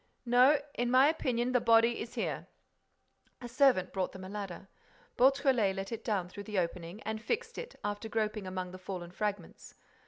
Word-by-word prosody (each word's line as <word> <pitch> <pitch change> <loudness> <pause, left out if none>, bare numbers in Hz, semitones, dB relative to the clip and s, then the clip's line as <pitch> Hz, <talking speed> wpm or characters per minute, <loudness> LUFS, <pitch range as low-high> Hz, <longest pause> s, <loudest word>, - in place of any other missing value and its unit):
—No, 250 +4 +5
in 245 0 -1
my 260 +3 +6
opinion, 250 -6 0
the 250 -1 +3
body 230 +1 +4
is 230 - -7
here." - - -3 0.9
A 245 - -7
servant 245 -7 +3
brought 190 -2 -2
them 190 - -9
a 185 - -7
ladder. 195 -2 -6 0.5
Beautrelet 260 -6 +3
let 195 +2 -5
it 230 -1 -5
down 200 -6 -1
through 200 +3 -9
the 210 -2 -4
opening 175 +2 -3
and 220 0 -4
fixed 465 - -3
it, - - -8
after 205 +2 -3
groping 215 -2 -2
among 185 -1 -4
the 185 - -9
fallen 185 -2 -6
fragments. 200 -2 -5
215 Hz, 180 wpm, -31 LUFS, 190-245 Hz, 0.9 s, my